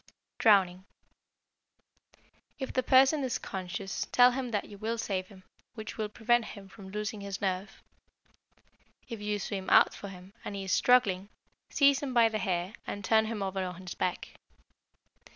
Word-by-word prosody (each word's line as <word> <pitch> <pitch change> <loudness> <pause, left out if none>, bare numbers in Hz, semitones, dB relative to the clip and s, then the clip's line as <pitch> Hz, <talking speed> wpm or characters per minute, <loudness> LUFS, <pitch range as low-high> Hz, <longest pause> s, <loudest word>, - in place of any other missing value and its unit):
Drowning 190 -5 +4 1.7
If 265 - -5
the 255 - +2
person 270 +4 +5
is 255 -2 -1
conscious 190 0 -5
tell 250 0 +6
him 255 0 -3
that 210 -3 -1
you 205 - -12
will 225 +2 -2
save 190 -4 -2
him, 190 -2 -16 0.3
which 220 -2 -7
will 215 -1 -3
prevent 240 +2 +2
him 200 -2 -10
from 190 0 -12
losing 210 +1 -4
his 200 -1 -5
nerve. 190 0 -3 1.2
If 230 -4 -7
you 210 0 -1
swim 195 -1 -4
out - - +6
for 200 - -8
him, 185 0 -12
and 200 - -5
he 195 - -4
is 190 - -4
struggling, 200 -6 +3 0.4
seize 280 -2 +4
him 265 -3 -4
by 230 -1 +6
the 215 -1 -2
hair 185 0 -2
and 205 -1 -5
turn 220 +1 +4
him 220 -2 -3
over 190 0 -3
on 180 -1 -6
his 180 -1 -7
back. 180 - -2
205 Hz, 170 wpm, -30 LUFS, 190-230 Hz, 1.7 s, tell